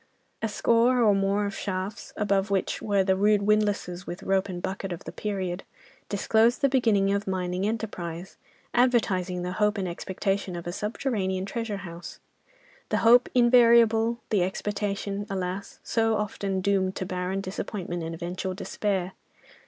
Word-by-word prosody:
A 225 - 0
score 235 +3 +3
or 210 -2 +5
more 195 +1 +1
of 200 -1 -4
shafts, 190 +1 -4
above 200 -1 +1
which 195 -1 -1
were 200 -2 +2
the 190 0 +2
rude 205 +1 +3
windlasses 205 -4 0
with 175 - -6
rope 195 0 +1
and 180 -1 -4
bucket 190 +1 -4
of 175 - -6
the - - -7
period, 190 -3 -3 0.5
disclosed 220 +5 +2
the 275 - +4
beginning 215 -7 +3
of 200 0 -2
mining 185 0 -1
enterprise, 185 -6 -4 0.4
advertising 195 -8 +2
the 180 - -3
hope 210 +2 +1
and 190 -2 -1
expectation 190 +2 -2
of 170 - -6
a 175 - -3
subterranean 195 -2 -2
treasure 230 0 -3
house—the 485 - -9
hope 240 +2 +6
invariable, 235 -2 +5
the 205 -4 +3
expectation, 200 +1 -2
alas! 190 0 -4
so 225 -1 +1
often 200 -2 -2
doomed 190 -1 +1
to 185 - -3
barren 185 +1 -2
disappointment 185 -2 -4
and 165 0 -4
eventual 180 +3 -4
despair. 195 -2 -2
200 Hz, 150 wpm, -27 LUFS, 185-215 Hz, 0.5 s, hope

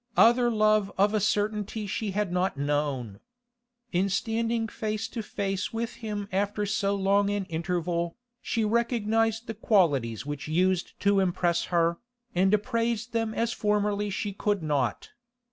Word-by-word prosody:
Other 240 +1 +6
love 215 -2 +3
of 205 +2 +3
a 215 - +2
certainty 210 +1 -1
she 205 +2 -2
had 200 -1 -1
not 180 -2 0
known. 140 -7 -1 0.7
In 190 +2 +1
standing 225 +3 0
face 215 0 -3
to 230 - -4
face 195 -2 -3
with 230 +1 -4
him 210 -2 -4
after 205 +2 0
so 200 -1 0
long 200 +1 +2
an 205 -1 -1
interval, 170 0 -2 0.2
she 225 -3 0
recognised 225 0 +1
the 225 - -4
qualities 150 - +2
which 145 0 -5
used 180 +3 0
to 200 0 +4
impress 175 -2 +1
her, 170 -1 +1 0.3
and 190 +2 +3
appraised 230 +1 0
them 225 -1 -1
as 230 0 0
formerly 210 0 0
she 200 +1 -3
could 205 -2 -1
not. 140 -7 -1
205 Hz, 145 wpm, -27 LUFS, 180-220 Hz, 0.7 s, Other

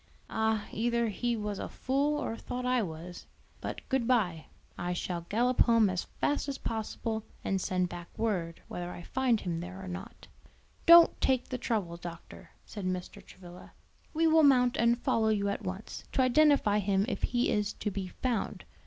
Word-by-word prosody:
"Ah, 220 -1 0
either 235 +1 0
he 240 +3 -1
was 210 -1 -3
a - - -4
fool 280 +3 0
or 240 -5 -3
thought 250 +2 -5
I 250 -1 +2
was. 175 -1 -7 0.3
But - - -5
good 265 -4 0
bye. 185 -11 +1 0.3
I 175 +1 -2
shall 175 -1 -4
gallop 245 +4 +1
home 230 -4 +5
as 180 - -2
fast 290 0 0
as 275 - -3
possible 220 0 -3 0.2
and 195 -1 0
send 185 -1 0
back 175 -1 -8
word 180 -7 -2
whether 175 0 -5
I 175 - -8
find 250 -1 +1
him 170 -2 -3
there 185 +2 -7
or 190 - -8
not." 190 +5 -8 0.6
"Don't 335 0 +8
take 260 -2 +1
the 255 - -3
trouble, 200 -8 -2
doctor," 170 -1 -10 0.2
said 205 -3 -7
Mr. 185 -1 -4
Travilla; 180 -1 -13 0.4
"we 325 +1 +1
will 320 0 +6
mount 250 -4 +5
and 235 +1 +3
follow 225 -2 +1
you 200 -2 +1
at 200 - -3
once, 190 +3 -6
to 265 - +3
identify 255 -5 +4
him 200 0 +1
if - - -3
he 245 0 +1
is 210 -1 0
to 210 - -3
be 190 -1 -4
found. 235 +3 -3
220 Hz, 180 wpm, -30 LUFS, 185-250 Hz, 0.6 s, Don't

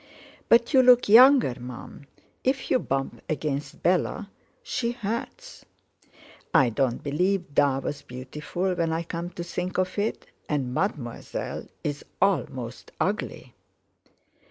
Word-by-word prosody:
"But 235 +4 +5
you 260 - +7
look 250 -1 +6
younger, 250 - +7
Mum. 125 +3 -9 0.4
If 265 +1 0
you - - +4
bump 135 - -3
against 150 -2 -3
Bella 185 +4 +1 0.3
she 240 - -2
hurts." 235 - -5 0.9
"I 130 - +6
don't 120 +1 0
believe 175 +3 0
'Da' 140 -2 +3
was 145 +1 -4
beautiful, 150 +9 -4
when 170 -2 0
I 165 +1 -1
come 170 +1 -5
to 175 -1 -6
think 180 +1 -4
of 185 +2 0
it; 210 +2 -2 0.2
and 135 -4 -1
Mademoiselle's 145 - -4 0.2
almost 130 - -1
ugly." - - -2
170 Hz, 120 wpm, -26 LUFS, 140-210 Hz, 0.9 s, you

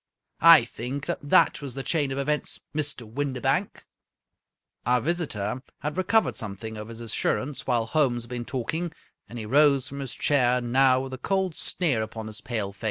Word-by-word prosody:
I 165 -6 +8
think 130 +4 -5
that - - -2
that 145 - +3
was 140 -4 -6
the 135 - -4
chain 145 -4 0
of 135 - -3
events, 150 +2 -1
Mr. 145 -4 -2
Windibank! 135 +3 -1 0.5
" - - -53
Our 125 0 +4
visitor 130 - -2 0.2
had 150 0 -3
recovered 185 +5 +2
something 110 0 -6
of 105 0 -7
his 115 0 -9
assurance 130 +4 -2
while 120 -3 +2
Holmes 120 -3 +1
had 120 - -14
been 120 -1 -4
talking, 160 +8 -3 0.4
and 120 - -8
he 110 - -5
rose 140 +2 +4
from 140 - -7
his 135 -4 -5
chair 125 -3 +3
now 130 +1 +3
with 135 0 -6
a 130 - -6
cold 190 +3 0
sneer 150 -8 0
upon 110 0 -5
his 110 0 -7
pale 105 -5 -3
face. 100 - -26
130 Hz, 185 wpm, -26 LUFS, 115-145 Hz, 0.5 s, I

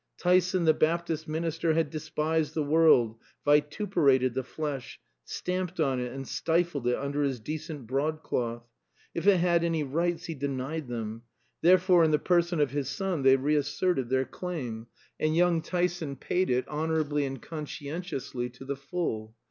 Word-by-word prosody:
Tyson 180 0 +3
the 160 - +6
Baptist 160 0 0
minister 160 0 0
had 160 -3 +1
despised 155 0 -1
the 155 - +1
world, 145 -7 +4 0.3
vituperated 145 - +3
the 130 - -1
flesh, 140 -1 -5 0.3
stamped 180 -1 -3
on 135 -5 +2
it 125 -1 -3
and 135 0 -6
stifled 165 -6 0
it 125 - +3
under 140 +1 -2
his 135 -4 0
decent 150 +1 -6
broadcloth. 130 -3 -2 0.5
If 170 - -2
it 200 -2 +7
had 170 -1 +3
any 165 -2 +1
rights 170 +4 -1
he 165 - -4
denied 140 +1 -3
them. 115 -2 -4 0.4
Therefore 180 0 +5
in 160 - +4
the 150 - +4
person 175 0 +1
of 145 -4 +2
his 140 -2 -2
son 190 -2 -2
they 135 0 +6
reasserted 145 +1 0
their 130 0 +2
claim; 125 -13 -5 0.3
and 155 0 +1
young 170 -1 +3
Tyson 175 -4 -1
paid 180 +7 -1
it 125 0 +1
honorably 150 -1 0
and 135 -1 -4
conscientiously 150 -4 -5
to 125 +2 -12
the 140 +1 -2
full. 135 -7 -4
155 Hz, 155 wpm, -28 LUFS, 135-170 Hz, 0.5 s, it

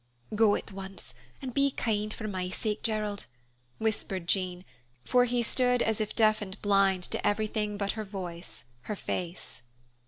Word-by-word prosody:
"Go, 220 +1 +5
go 205 - +5
at - - -5
once, 195 0 -7 0.3
and 255 -2 -3
be 280 +2 +4
kind, 215 -5 0
for 215 0 -4
my 185 -3 -2
sake, 210 +3 -1
Gerald," 210 - -1 0.5
whispered 205 -5 -1
Jean, 185 -1 0 0.4
for 250 0 +5
he 245 0 +1
stood 250 +1 +3
as 220 0 +1
if 215 - -2
deaf 215 -2 +5
and 195 0 -6
blind 195 -2 +4
to - - -2
everything 210 0 0
but 200 -1 0
her 220 - -4
voice, 180 -4 -6 0.2
her 210 - -2
face. 180 -6 -4
210 Hz, 165 wpm, -30 LUFS, 190-220 Hz, 0.5 s, Go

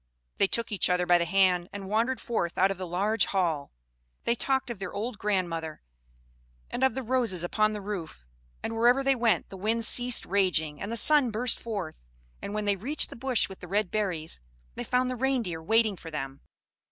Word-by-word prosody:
They - - +4
took 230 +3 0
each 195 -4 +1
other 180 0 +2
by 175 0 +5
the 170 - 0
hand, 180 -1 +2
and 200 -1 -7
wandered 225 +5 0
forth 195 -9 -2
out 190 +1 +4
of 195 - -5
the 185 - -4
large 200 +3 +2
hall; 170 -7 -1 0.5
they - - +2
talked 265 +1 0
of 225 - -7
their 195 -2 -5
old 215 +2 -4
grandmother, 170 -6 -2 0.9
and 255 - -2
of 265 -4 +3
the 265 - -3
roses 230 -8 0
upon 215 +4 +1
the 210 - -5
roof; 180 - -6 0.4
and 225 - -3
wherever 245 +4 +4
they 275 0 +4
went, 235 -3 +1
the 195 - -9
winds 220 +3 0
ceased 245 -1 +4
raging, 175 -6 +1
and 205 - -4
the 230 - -1
sun 290 -1 +5
burst 235 +3 +1
forth. 200 -8 -5 0.4
And 200 - -5
when 210 0 -2
they 205 -1 +2
reached 270 +11 0
the - - -8
bush 250 -1 +1
with 190 - -11
the 180 - -10
red 200 0 0
berries, 175 - -2 0.3
they - - -5
found 250 0 +1
the - - -3
Reindeer 240 -10 -1
waiting 220 +4 +2
for 165 -2 -10
them. 135 -3 -6
205 Hz, 205 wpm, -28 LUFS, 180-235 Hz, 0.9 s, by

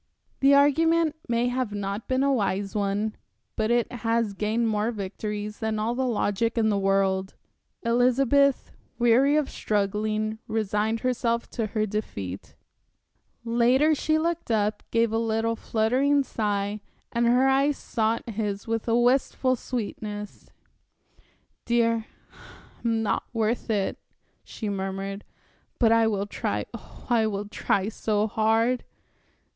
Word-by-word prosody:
The 275 +1 +6
argument 320 +3 +3
may 235 +1 +2
not 250 -3 -2 0.3
have - - -40
been 260 +1 +1
a 280 0 +3
wise 200 -4 -1
one, 205 +1 -1 0.4
but 220 0 0
it 240 0 +1
has 230 -3 0
gained 215 +3 0
more 215 0 0
victories 210 0 -5
than 220 -1 -1
all 220 +2 0
the 260 +1 -1
logic 225 0 0
in 220 -1 +3
the 205 - +1
world. 195 -1 +1 0.5
Elizabeth, 255 +3 +3 0.3
weary 250 +4 +4
of 300 -3 +1
struggling, 215 +1 -1
resigned 215 +1 -1
herself 235 -2 -1
to 225 -3 -2
her 215 0 -1
defeat.... 100 - -5 0.9
Later 245 +6 +3
she 310 +1 +1
looked 335 -1 -2
up, 210 -1 +1
gave 230 -1 +2
a 225 - +2
little, 225 0 0
fluttering 255 +7 +1
sigh, 205 -3 -2 0.3
and 235 0 +1
her 250 +3 +4
eyes 275 +2 +3
sought 225 +1 -1
his 205 -3 -3
with 225 0 -2
a 230 0 +3
wistful 255 +1 +2
sweetness. 210 -4 -6 1.1
"Dear, 230 -1 +1 0.8
I'm 225 -1 +1
not 210 - -1
worth 225 +1 -1
it," 205 -3 0 0.4
she 220 - -6
murmured, 195 0 -4 0.5
"but 230 -2 +4
I 230 0 +4
will 200 -2 0
try 205 - -3
oh, - - -12
I 230 -3 +3
will 205 -1 -3
try 200 -1 -1
so 215 -1 0
hard." 225 +3 +1
225 Hz, 135 wpm, -26 LUFS, 210-245 Hz, 1.1 s, The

